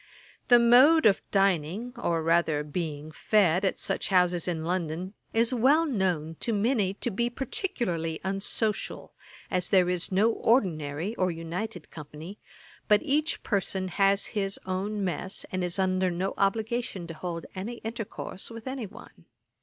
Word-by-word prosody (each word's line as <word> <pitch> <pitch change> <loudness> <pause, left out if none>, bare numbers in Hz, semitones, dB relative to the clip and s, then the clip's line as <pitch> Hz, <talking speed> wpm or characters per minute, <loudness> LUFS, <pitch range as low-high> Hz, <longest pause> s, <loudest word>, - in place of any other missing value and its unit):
The 245 - +8
mode 255 +7 +6
of 200 -3 +5
dining, 195 +4 +1
or 170 -9 -1
rather 165 -2 +2
being 150 -1 -4
fed, 185 0 +2
at 190 - +1
such - - -2
houses 180 -2 +2
in 160 -3 -2
London, 175 +1 -2 0.2
is 230 +2 +2
well 275 +7 +4
known 180 - -1
to 230 - -1
many 205 -2 +1
to - - -2
be 235 +5 0
particularly 185 - -2
unsocial, 195 +2 -2 0.4
as 180 -1 0
there 180 -2 +4
is 180 0 -2
no 205 +5 +3
Ordinary, 175 - 0
or 185 -1 +2
united 170 +2 -5
company, 155 +5 -9 0.5
but 210 0 +4
each 305 +2 0
person 190 -2 -1
has 195 +2 +2
his 195 -2 -1
own 195 +3 -2
mess, 185 +1 -2
and 185 -1 -1
is 180 +1 -1
under 185 -1 +1
no 180 +2 -2
obligation 220 -1 -1
to 165 - -7
hold 170 0 -5
any 200 +6 -5
intercourse 220 -4 -6
with 230 -1 -9
any 260 -4 -4
one. - - -15
190 Hz, 150 wpm, -28 LUFS, 175-225 Hz, 0.5 s, The